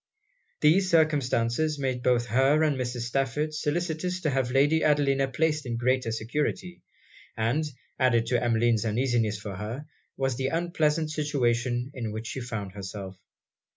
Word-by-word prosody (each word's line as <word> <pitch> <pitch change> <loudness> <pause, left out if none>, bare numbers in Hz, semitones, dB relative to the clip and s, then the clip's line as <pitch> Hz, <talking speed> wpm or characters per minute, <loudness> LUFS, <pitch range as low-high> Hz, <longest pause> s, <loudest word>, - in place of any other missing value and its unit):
These 180 +5 +4
circumstances 150 -3 +2
made 130 -3 -2
both 120 -1 +2
her 135 +6 +3
and 150 -2 +2
Mrs. 125 -2 -3
Stafford 135 +5 -1
solicitous 165 +3 -2
to 155 - 0
have 130 -2 0
Lady 145 +5 +3
Adelina 140 -2 +3
placed 150 +3 0
in 120 -3 -3
greater 125 0 +1
security; 150 +10 -3 0.6
and, 120 +8 +1 0.3
added 120 -3 +3
to 120 0 0
Emmeline's 115 -2 +2
uneasiness 115 -2 0
for 100 -2 -6
her, 115 +8 -5 0.3
was 135 -2 -1
the 135 0 0
unpleasant 160 -1 0
situation 125 -4 0
in 115 -4 -4
which 110 +1 -5
she 130 - -5
found 110 -5 -5
herself. 95 -1 -7
130 Hz, 145 wpm, -27 LUFS, 115-150 Hz, 0.6 s, These